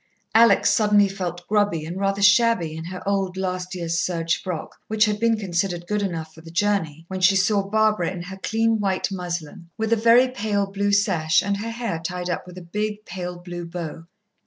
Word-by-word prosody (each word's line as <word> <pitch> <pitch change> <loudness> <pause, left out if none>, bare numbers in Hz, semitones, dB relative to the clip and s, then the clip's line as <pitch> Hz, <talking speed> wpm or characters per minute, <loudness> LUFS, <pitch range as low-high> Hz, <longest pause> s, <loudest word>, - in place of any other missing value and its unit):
Alex 225 -2 +5
suddenly 210 -2 +4
felt 180 -3 -5
grubby 205 -7 +1
and 175 +4 -5
rather 195 0 0
shabby 205 -6 +4
in 160 0 -6
her 185 +2 -7
old 195 -2 0
last 185 -1 -3
year's 170 -1 -1
serge 165 -2 -1
frock, 180 -4 -5
which 215 0 +3
had 210 -1 -1
been 230 0 +2
considered 175 -3 -2
good 210 +2 -1
enough 165 -5 -4
for 160 - -14
the 165 - -12
journey, 170 -4 -1
when 190 +1 -4
she 190 +2 +5
saw 200 +2 +3
Barbara 215 -2 +1
in 180 -2 -6
her 190 +1 -8
clean 225 +2 +1
white 195 -1 -1
muslin, 175 -3 -5
with 220 +1 0
a - - +5
very 230 +3 +5
pale 205 -4 -1
blue 200 +1 -1
sash, 170 -6 +2
and 200 0 -1
her 220 +3 -4
hair 230 -7 -3
tied 180 +1 -3
up 180 - -4
with 180 0 -11
a 180 - -8
big 210 +4 -3
pale 180 0 -6
blue 175 -1 -7
bow. 165 -1 -7
190 Hz, 205 wpm, -23 LUFS, 175-210 Hz, -, Alex